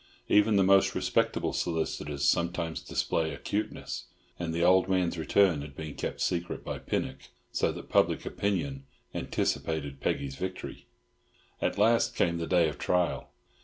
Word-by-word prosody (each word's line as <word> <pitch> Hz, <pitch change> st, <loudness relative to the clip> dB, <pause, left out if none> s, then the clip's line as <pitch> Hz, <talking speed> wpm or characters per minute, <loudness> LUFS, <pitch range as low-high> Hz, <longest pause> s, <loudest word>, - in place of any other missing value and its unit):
Even 105 Hz, +1 st, +5 dB
the 100 Hz, -, +5 dB
most 95 Hz, +1 st, +4 dB
respectable -, -, +1 dB
solicitors 75 Hz, -4 st, -2 dB
sometimes 85 Hz, +1 st, 0 dB
display 80 Hz, -1 st, -1 dB
acuteness, 105 Hz, +8 st, -3 dB, 0.3 s
and 85 Hz, -2 st, -2 dB
the 85 Hz, +1 st, 0 dB
old 95 Hz, +1 st, +5 dB
man's 90 Hz, -2 st, +1 dB
return 85 Hz, -1 st, +3 dB
had 70 Hz, -1 st, -9 dB
been 75 Hz, -1 st, -6 dB
kept -, -, -4 dB
secret 85 Hz, -1 st, -1 dB
by -, -, -4 dB
Pinnock, -, -, -3 dB, 0.2 s
so -, -, +1 dB
that -, -, -8 dB
public -, -, +2 dB
opinion 135 Hz, +8 st, -2 dB, 0.3 s
anticipated 70 Hz, -4 st, -2 dB
Peggy's 70 Hz, -1 st, -1 dB
victory. 95 Hz, 0 st, -6 dB, 0.7 s
At -, -, 0 dB
last 115 Hz, +3 st, +3 dB
came 85 Hz, -2 st, +1 dB
the 85 Hz, -, -3 dB
day 90 Hz, -3 st, +4 dB
of 75 Hz, -, -5 dB
trial. 90 Hz, -1 st, 0 dB
85 Hz, 145 wpm, -29 LUFS, 80-95 Hz, 0.7 s, Even